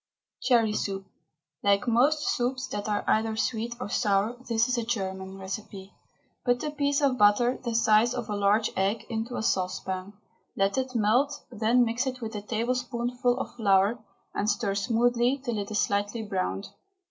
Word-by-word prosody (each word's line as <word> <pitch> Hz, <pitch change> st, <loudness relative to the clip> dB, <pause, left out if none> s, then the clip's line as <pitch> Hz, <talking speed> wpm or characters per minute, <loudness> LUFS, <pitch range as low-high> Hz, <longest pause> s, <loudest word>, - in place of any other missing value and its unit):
CHERRY 230 Hz, -4 st, +3 dB
SOUP. 195 Hz, -2 st, -3 dB, 0.6 s
Like 200 Hz, +4 st, +2 dB
most 280 Hz, +6 st, +3 dB
soups 260 Hz, +2 st, 0 dB
that 205 Hz, +1 st, -4 dB
are 205 Hz, -1 st, 0 dB
either 220 Hz, 0 st, +1 dB
sweet 230 Hz, +1 st, -1 dB
or 250 Hz, -, -4 dB
sour, 205 Hz, +1 st, +1 dB
this 230 Hz, -1 st, +2 dB
is 250 Hz, -, 0 dB
a 235 Hz, -, -1 dB
German 190 Hz, -4 st, -3 dB
recipe. 195 Hz, 0 st, -7 dB, 0.5 s
Put 245 Hz, +1 st, +1 dB
a 300 Hz, -, -2 dB
piece 285 Hz, 0 st, 0 dB
of 270 Hz, -3 st, +2 dB
butter, 210 Hz, +5 st, +4 dB
the 235 Hz, -2 st, -2 dB
size 225 Hz, +2 st, +4 dB
of 240 Hz, -3 st, -4 dB
a 210 Hz, -, -2 dB
large 205 Hz, +2 st, +2 dB
egg, 205 Hz, +4 st, 0 dB
into 225 Hz, +2 st, -3 dB
a -, -, -2 dB
saucepan. 185 Hz, 0 st, -2 dB, 0.4 s
Let 195 Hz, 0 st, +1 dB
it 255 Hz, -1 st, -4 dB
melt, 245 Hz, +7 st, +2 dB
then 235 Hz, +2 st, +3 dB
mix 235 Hz, +3 st, -1 dB
it 255 Hz, -1 st, -3 dB
with 225 Hz, -2 st, -5 dB
a 210 Hz, -, -4 dB
tablespoonful 245 Hz, +2 st, -1 dB
of -, -, -5 dB
flour, 200 Hz, +1 st, +3 dB, 0.3 s
and 205 Hz, -, 0 dB
stir 205 Hz, -1 st, 0 dB
smoothly 240 Hz, +4 st, +2 dB
until 245 Hz, -6 st, -3 dB
it 200 Hz, -, -4 dB
is 215 Hz, -1 st, +1 dB
lightly 205 Hz, +3 st, -1 dB
browned. 195 Hz, -1 st, -3 dB
225 Hz, 170 wpm, -27 LUFS, 205-245 Hz, 0.6 s, butter